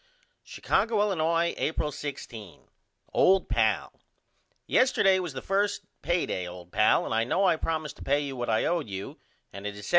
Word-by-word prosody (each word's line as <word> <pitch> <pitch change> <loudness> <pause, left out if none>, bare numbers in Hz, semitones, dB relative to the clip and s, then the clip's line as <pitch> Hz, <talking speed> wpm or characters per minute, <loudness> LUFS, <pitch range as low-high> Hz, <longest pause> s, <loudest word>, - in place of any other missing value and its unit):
Chicago, 225 -2 0
Illinois, 170 -4 +1
April 150 -1 -1
16. 130 - -8 0.5
OLD 190 0 +4
PAL: - - +1 0.7
Yesterday 195 -7 +3
was 175 -5 -4
the 130 - -6
1st 200 +1 0 0.2
pay 175 0 +1
day 90 -1 -3
old 90 0 -10
pal 105 - +3
and - - -3
I 115 +1 +2
know 185 +11 +1
I 175 - +4
promised 155 -1 -3
to - - -10
pay 145 +2 +2
you 140 -2 -4
what 120 -1 -3
I 110 - +2
owe 175 0 +1
you 100 -9 -7 0.3
and 100 +1 -6
it 100 - -5
is 105 - -9
$75. - - -6
150 Hz, 180 wpm, -27 LUFS, 110-180 Hz, 0.7 s, OLD